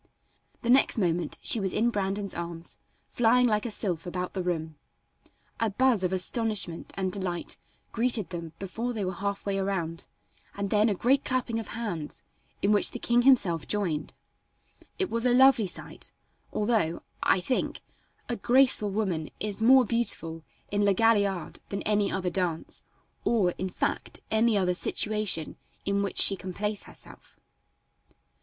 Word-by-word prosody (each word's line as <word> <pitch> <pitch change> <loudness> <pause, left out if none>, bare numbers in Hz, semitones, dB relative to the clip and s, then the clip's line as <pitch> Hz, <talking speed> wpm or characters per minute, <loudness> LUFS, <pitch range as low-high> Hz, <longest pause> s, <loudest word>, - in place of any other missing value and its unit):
The 235 - -2
next 265 -1 +4
moment 175 -5 0
she 230 - +4
was 190 -2 0
in 235 +2 +2
Brandon's 200 -1 -2
arms, 170 0 -6 0.3
flying 245 +1 +4
like 215 -1 +1
a - - -3
sylph 180 -6 -1
about 180 0 -4
the 190 - -2
room. 160 -3 -3 0.8
A 225 - +1
buzz 235 -1 +2
of 180 - 0
astonishment 195 -2 -1
and 190 -1 -1
delight 180 -3 -2 0.3
greeted 230 -4 0
them 170 -2 -6
before 225 +6 -4
they 210 -4 -2
were 185 - -2
half 200 +2 -4
way 195 -1 -1
around, 170 -4 -3 0.5
and 200 -1 -3
then 215 +1 +4
a 205 - 0
great 265 +8 +2
clapping 245 -3 -1
of 220 - -6
hands, 175 -10 -5 0.4
in 200 - +3
which 205 - +4
the - - -6
king 240 0 +2
himself 205 - +3
joined. 175 -8 -2 0.8
It 380 -2 -1
was 230 0 -1
a 250 -1 +3
lovely 265 -5 +6
sight, 180 - -9 0.4
although, 210 -7 0 0.2
I - - +3
think, 220 +8 -2 0.5
a 240 - -1
graceful 245 -1 +3
woman 190 -7 -2
is 210 0 -3
more 255 +2 +6
beautiful 165 -8 +2 0.3
in 205 0 +1
La 200 -1 +4
Galliard 200 -4 +1
than 200 - -4
any 205 -2 +1
other 185 -2 -1
dance, 170 -3 -2 0.4
or, 205 -7 +2
in 185 - -2
fact, - - -3
any 220 0 +3
other 180 -2 +2
situation 210 -3 -1 0.3
in 200 0 +1
which 200 - -3
she 195 - +8
can 185 -1 -8
place 210 0 -3
herself. - - -15
200 Hz, 160 wpm, -28 LUFS, 180-230 Hz, 0.8 s, she